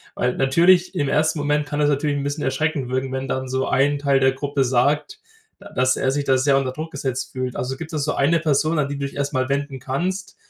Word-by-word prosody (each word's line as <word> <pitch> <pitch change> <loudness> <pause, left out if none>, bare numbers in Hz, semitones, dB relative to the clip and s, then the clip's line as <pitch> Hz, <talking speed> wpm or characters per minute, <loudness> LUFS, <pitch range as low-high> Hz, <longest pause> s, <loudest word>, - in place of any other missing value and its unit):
weil 125 0 0
natürlich 175 +7 +4
im 145 - 0
ersten 155 +2 +1
Moment 145 0 0
kann 145 0 -2
es 145 - +3
natürlich 145 0 0
'n 140 - -3
bisschen 145 +1 -3
erschreckend 135 0 -1
wirken, 130 +1 -2
wenn 130 0 -3
dann 130 0 -2
so 130 +1 -1
ein 140 +2 +2
Teil 140 -1 +2
der 135 0 +4
Gruppe 140 +1 -1
sagt, 140 - +1 0.6
dass 130 +1 +3
er 130 - +1
sich 145 +1 -1
da 130 -1 +3
sehr 135 +1 +3
unter 135 -2 -1
Druck 155 +4 -6
gesetzt 135 -2 -3
fühlt. 130 -1 -4
Also 130 +1 -3
gibt 160 +1 -8
es 150 - -1
so - - -1
eine 165 +5 +3
Person, 155 +1 +1
an 140 - 0
die 145 - -4
du 140 - -3
dich 140 - -7
erstmal 140 -2 -1
wenden 140 -1 -2
kannst, 180 +10 -3
140 Hz, 240 wpm, -22 LUFS, 130-150 Hz, 0.6 s, natürlich